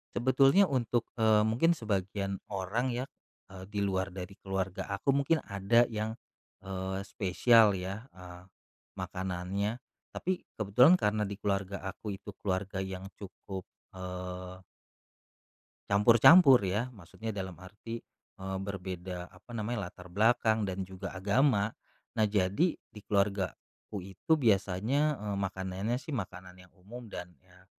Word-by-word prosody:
Sebetulnya 135 +9 +5
untuk, 120 -4 0
eee, 110 -2 +4
mungkin 120 +10 +3
sebagian 100 - -1 0.2
orang 105 +7 -1
ya, 125 +2 -2 0.4
eee, 95 -1 -10
di 105 - -2
luar 95 -1 0
dari 95 +1 -7
keluarga 95 -1 -2
aku, 130 +8 +1
mungkin 140 +4 +2
ada 100 +5 +3
yang, 110 -1 -3 0.5
eee, 95 0 -4
spesial 110 +3 +4
ya, 95 +4 -5
eee, 90 -1 -12 0.6
makanannya. 95 +4 -3 0.3
Tapi 185 0 -2 0.2
kebetulan 125 - +6
karena 105 -4 +1
di 100 0 -5
keluarga 100 -1 -1
aku 105 +2 -5
itu 100 +1 -8
keluarga 95 0 -1
yang 95 0 -6
cukup, 95 -1 -8 0.3
eee 90 0 -6 1.3
campur-campur 120 - +8
ya, 105 +7 0
maksudnya 110 +3 -7
dalam 95 -2 -5
arti, 105 +5 -8 0.4
eee, 95 0 -4
berbeda 95 -2 -5
apa - - -16
namanya, 105 -4 -2
latar 90 0 -14
belakang 110 +1 +3
dan 95 0 -3
juga 95 0 -7
agama. 105 +2 +2 0.4
Nah, 110 - +4
jadi 100 - +2
di 105 - -15
keluargaku 100 -1 -2
itu 95 - -1
biasanya, 115 +6 +2
eee, 105 -1 -3
makanannya 95 +4 -2
sih 155 - -8
makanan 90 -5 -6
yang 90 - -19
umum 115 +6 -10
dan, 90 -2 -7
ya 90 0 -22
100 Hz, 130 wpm, -31 LUFS, 95-115 Hz, 1.3 s, campur-campur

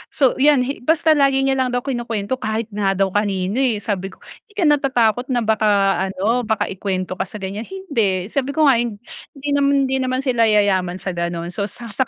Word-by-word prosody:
So 265 -4 +4
yan, 285 -2 +4
hi 275 +3 -4
basta 320 +4 +2
lagi 275 -2 +3
niya 270 0 +1
lang 250 -1 0
daw 245 - -1
kinukwento 240 -2 -3
kahit 220 0 -3
nga 200 -1 0
daw 195 0 +1
kanino, 200 +1 -1
eh. 235 -6 0
Sabi 195 -3 -2
ko, - - -13 0.3
"Di 415 - -25
ka 400 - 0
natatakot 260 -6 +2
na 245 -3 0
baka 220 0 +1 0.4
ano, 215 +5 -1
baka 220 -3 -1
ikuwento 185 -1 -3
ka - - -1
sa - - -11
ganiyan?" 205 +2 -5
"Hind," 385 -2 -10 0.4
sabi 275 0 -2
ko 315 - +3
nga 270 -5 +5
hindi 240 +5 -7
naman, 280 -1 +3
hindi 265 0 0
naman 255 +1 -1
sila 240 -4 +2
yayaman 195 -4 +2
sa 190 - -2
gano'n. 170 0 -4
So 200 +2 -3
sa 235 +2 -9
sa 260 +3 0
235 Hz, 210 wpm, -20 LUFS, 200-270 Hz, 0.4 s, nga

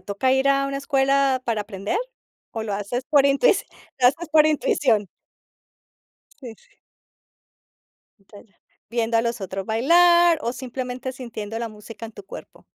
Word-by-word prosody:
toca 200 +7 0
ir 265 +1 +2
a 275 0 +2
una 275 0 -3
escuela 275 -1 +1
para 225 -3 -1
aprender 205 - -4 0.5
o 225 - -4
lo 215 -2 -4
haces 205 +5 -4
por 280 -2 +5
intuici 280 - +3 0.4
lo 245 - +6
haces 320 +5 -4
por 310 -1 +5
intuición? 255 -8 +1 1.3
Sí. 245 -5 -9 1.7
Ya, 200 +1 -16
ya. 200 - -30 0.4
Viendo 230 -1 0
a 225 - +3
los 235 -1 -3
otros 195 0 -5
bailar 345 +8 +4
o 235 - -2
simplemente 255 0 -6
sintiendo 225 -4 -7
la 235 0 -4
música 215 +2 -11
en 225 - -13
tu - - -12
cuerpo. - - -12
250 Hz, 150 wpm, -23 LUFS, 220-275 Hz, 1.7 s, lo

